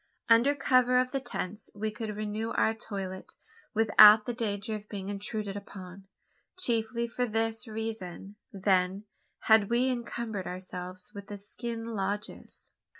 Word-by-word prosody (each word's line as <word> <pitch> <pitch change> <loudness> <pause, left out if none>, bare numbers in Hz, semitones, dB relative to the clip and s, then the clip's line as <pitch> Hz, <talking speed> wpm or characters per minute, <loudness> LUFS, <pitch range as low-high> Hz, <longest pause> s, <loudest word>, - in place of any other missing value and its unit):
Under 235 +5 +5
cover 255 -2 +3
of 255 0 +2
the 275 - -1
tents, 210 -5 -5
we 215 +1 -2
could 215 -1 -5
renew 215 +1 -3
our 220 - +2
toilet 195 -4 -6 0.4
without 215 0 +8
the 245 - -2
danger 220 -2 -3
of 210 0 -7
being 195 -2 -5
intruded 205 0 -2
upon. 195 -1 -10 0.5
Chiefly 235 -6 +1
for 245 +1 -2
this 225 +1 -1
reason, 215 -3 -6 0.2
then, 190 0 +1 0.4
had 220 -2 +5
we 245 +2 +2
encumbered 235 -5 -4
ourselves 180 0 -7
with 200 -1 -9
the 205 - -6
skin 225 +3 -5
lodges. 205 -2 -4
215 Hz, 140 wpm, -29 LUFS, 200-230 Hz, 0.5 s, without